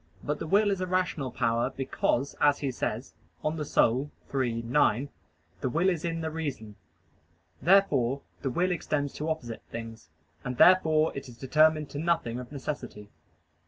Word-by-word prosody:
But 150 - -2
the - - -4
will 205 +4 +4
is 195 -2 -1
a 185 - -1
rational 180 -7 0
power, 115 -1 0
because, 135 0 -1
as 145 -1 +5
he 140 -2 -2
says 120 0 -4 0.3
(De - - 0
Anima 145 -4 +1 0.3
iii, 120 -3 0
9), 125 +1 +2 0.5
"the 130 - -1
will 170 +8 +2
is 170 -4 -2
in 165 -1 -2
the 160 0 -3
reason." 140 -10 -5 0.9
Therefore 140 -7 +3 0.2
the 135 - -1
will 180 +8 +1
extends 150 -4 -1
to 155 +2 -3
opposite 120 -8 -4
things, 115 -3 -8 0.3
and 125 -1 -4
therefore 160 -4 +5
it 140 -1 -6
is 120 - -13
determined 155 +3 +3
to 145 - -5
nothing 165 -8 0
of 125 +1 -9
necessity. 135 -7 -6
145 Hz, 160 wpm, -28 LUFS, 125-160 Hz, 0.9 s, as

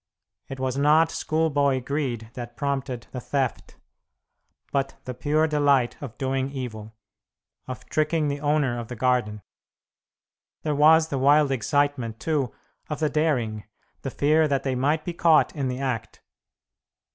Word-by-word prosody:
It 135 - -6
was 130 +1 -1
not 155 +3 +4
schoolboy 145 -4 +1
greed 125 -6 -3
that 120 -1 -8
prompted 135 -4 -2
the 125 - -5
theft, 135 -1 -2 1.0
but 135 -1 -1
the 125 - -4
pure 145 +5 +1
delight 145 -5 +2
of 135 -6 -8
doing 135 0 -1
evil, 110 -5 -7 0.7
of 130 -1 -7
tricking 155 0 0
the 145 0 -2
owner 145 -5 +1
of 115 - -6
the 125 - -6
garden. 115 -4 0 1.2
There 150 - 0
was 160 +2 +5
the 140 - -2
wild 145 +1 +4
excitement, 135 -3 0
too, 145 -7 -1 0.4
of 150 - -3
the 155 -1 0
daring; 125 -9 0 0.4
the 135 - -4
fear 155 +4 +3
that 140 -2 0
they 135 - -1
might 145 +5 0
be 175 - -3
caught 165 -2 +3
in 140 -3 -1
the 125 0 -3
act. 125 -5 -4
140 Hz, 145 wpm, -25 LUFS, 125-150 Hz, 1.2 s, was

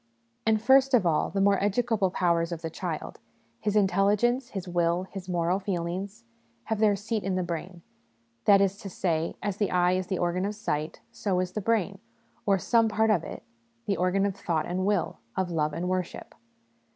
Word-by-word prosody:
And 220 -1 +4
first 265 +3 +5
of 220 -7 +3
all, 160 -3 +2
the 195 - -1
more 200 0 +3
educable 210 -1 +1
powers 170 -2 +1
of 170 -1 -5
the 165 - -3
child 165 -2 -5 0.4
his 210 -1 -1
intelligence, 210 +6 +2
his 190 -2 -6
will, 175 0 +1
his 190 -1 -9
moral 175 +1 +1
feelings 190 +3 -4 0.4
have 220 -2 -2
their 210 -2 +4
seat 215 +2 -3
in 190 -1 -1
the 185 - 0
brain; 175 0 -6 0.6
that 200 -1 +6
is 195 0 +1
to 205 -2 -8
say, 165 -3 -1
as 205 -2 -2
the 205 - +1
eye 180 0 +3
is 185 0 -1
the 190 - -1
organ 175 +1 0
of 205 +2 -2
sight, 155 -8 -3
so 200 -6 -1
is 180 0 -1
the 210 - -3
brain, 200 -2 0 0.5
or 195 -1 +4
some 225 +4 +3
part 220 +1 +2
of 180 -6 +2
it, - - -8 0.4
the 200 -2 0
organ 185 +2 +2
of 200 -2 -1
thought 170 -6 -1
and 185 +2 -1
will, 205 -4 0 0.2
of 185 -2 0
love 155 -2 0
and 165 +4 -3
worship. 185 -1 -3
190 Hz, 195 wpm, -27 LUFS, 175-205 Hz, 0.6 s, that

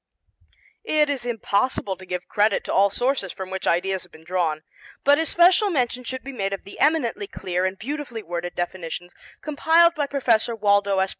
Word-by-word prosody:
It 300 -1 +2
is 255 -4 -3
impossible 210 -3 0
to 185 0 -14
give 180 0 -4
credit 210 0 +2
to - - -4
all 200 +1 +5
sources 245 -2 -1
from 190 -1 -7
which 190 0 -4
ideas 190 +2 +1
have - - -13
been 160 - -16
drawn, 160 -3 -1 0.4
but 285 +2 +5
especial 350 +5 +4
mention 250 -6 -1
should 260 +1 -6
be 275 - -7
made 195 -5 -2
of 195 - -5
the 200 - -12
eminently 280 -9 +1
clear 180 -1 -2
and 190 +1 -2
beautifully 260 -2 -5
worded 175 0 -5
definitions 175 0 -5 0.3
compiled 325 +3 +4
by 295 -4 -1
Professor 235 -5 +1
Waldo 200 -2 +2
S. 190 0 +2
210 Hz, 180 wpm, -23 LUFS, 185-280 Hz, 0.4 s, all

